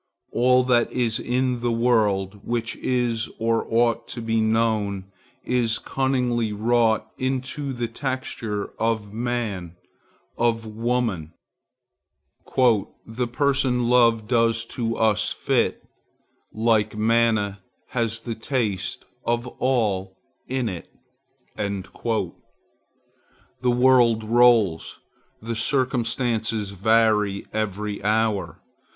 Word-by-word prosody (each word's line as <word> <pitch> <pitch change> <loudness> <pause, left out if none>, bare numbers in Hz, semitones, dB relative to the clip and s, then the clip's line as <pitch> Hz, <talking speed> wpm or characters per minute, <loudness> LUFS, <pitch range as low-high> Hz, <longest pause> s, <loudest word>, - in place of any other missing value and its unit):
All 125 +1 +4
that 120 -2 +2
is 115 -3 0
in 125 0 0
the 120 0 0
world, 105 -4 +1
which 115 -1 -2
is 120 -3 0
or 115 0 0
ought 115 0 +2
to - - -6
be 115 -1 0
known, 110 -3 0 0.3
is 120 -3 +1
cunningly 125 -4 0
wrought 110 0 +1
into 130 +2 -2
the 120 -2 -2
texture 115 -4 -4
of 110 -2 -1
man, 110 -7 -3 0.6
of 115 -1 +1
woman:— 110 -7 -2 1.7
"The 120 +2 -3
person 130 -3 +1
love 115 -3 +4
does 115 -1 +2
to 115 -2 -2
us 110 -1 +2
fit, - - 0 0.7
Like 110 -1 +1
manna, 110 -2 +2 0.3
has 115 -2 -1
the 115 0 -4
taste 110 -5 -2 0.2
of 120 +1 0
all 100 -7 0 0.3
in 130 -2 -1
it." 90 -5 -6 0.6
The 100 0 -3 1.3
world 120 -2 +4
rolls; 115 -6 +3 0.4
the 115 +1 -4
circumstances 115 -4 0
vary 105 0 +2
every 105 -1 -3
hour. 110 -1 0
115 Hz, 95 wpm, -24 LUFS, 105-120 Hz, 1.7 s, All